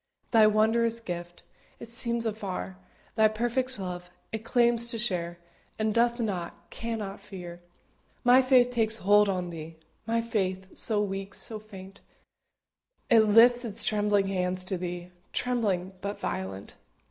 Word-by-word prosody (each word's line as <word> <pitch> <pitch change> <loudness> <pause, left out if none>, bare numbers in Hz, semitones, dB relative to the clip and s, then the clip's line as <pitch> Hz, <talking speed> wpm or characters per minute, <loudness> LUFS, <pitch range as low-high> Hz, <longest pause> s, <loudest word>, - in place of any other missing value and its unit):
Thy 220 -2 +6
wondrous 225 +2 +2
gift 175 -4 -7 0.4
It 235 - -9
sees 235 0 +1
afar; 195 - -4 0.4
Thy 220 0 +5
perfect 240 +4 -2
love 180 -2 -6 0.2
It 220 0 -4
claims 235 0 +3
to 235 - -4
share, 175 -6 -2 0.4
And 215 -1 0
doth 235 +1 +2
not, 180 -5 -4
cannot 215 -4 -5
fear. 180 -4 -9 0.6
My 250 +1 +7
faith 255 -1 +4
takes 225 -2 +1
hold 205 +1 +4
on 180 -2 -2
Thee 165 0 -8 0.3
My 230 0 +1
faith, 190 -5 -2
so 210 -2 +1
weak, 195 -1 -5
so 220 -2 -3
faint; 195 -2 -12 1.1
It 225 -2 +7
lifts 240 +3 +6
its 220 -3 -3
trembling 205 -2 +2
hands 185 -1 -1
to 185 -1 -4
be, 175 0 -5 0.2
Trembling, 205 -7 0
but 200 +1 -4
violent. 95 +1 -5
210 Hz, 140 wpm, -28 LUFS, 185-230 Hz, 1.1 s, My